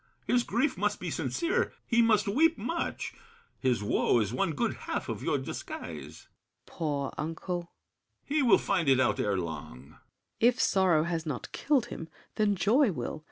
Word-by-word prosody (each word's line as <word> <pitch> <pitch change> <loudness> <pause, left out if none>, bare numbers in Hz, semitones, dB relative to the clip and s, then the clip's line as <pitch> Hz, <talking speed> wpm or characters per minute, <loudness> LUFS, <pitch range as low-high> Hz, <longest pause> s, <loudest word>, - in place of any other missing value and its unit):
His 245 - +3
grief 235 -1 0
must 205 +1 0
be - - -4
sincere; 340 +2 0
he 235 -1 +3
must 215 -3 +3
weep 320 +11 +3
much. 330 +10 -3 0.5
His 125 -5 +1
woe 105 - +2
is 105 0 -1
one 165 +5 0
good 145 - 0 0.2
half - - -2
of - - -4
your - - +1
disguise. - - -7
SAVERNY. - - -23 0.4
Poor 145 -4 -3
uncle! 165 +3 -3 0.7
BRICHANTEAU. 285 - -2
He 305 - +4
will 240 -6 +6
find 165 -6 0
it 130 -1 +5
out 120 -5 +2
ere 100 -2 +1
long. 85 -3 -5 0.2
SAVERNY. - - -19 0.4
If 245 +2 +4
sorrow 185 -6 +3
has 165 -1 -2
not 140 -5 -4
killed 275 -5 +1
him, 165 - -7 0.3
then 210 -1 +3
joy 215 +7 +3
will. 135 0 -4
185 Hz, 175 wpm, -29 LUFS, 140-235 Hz, 0.7 s, will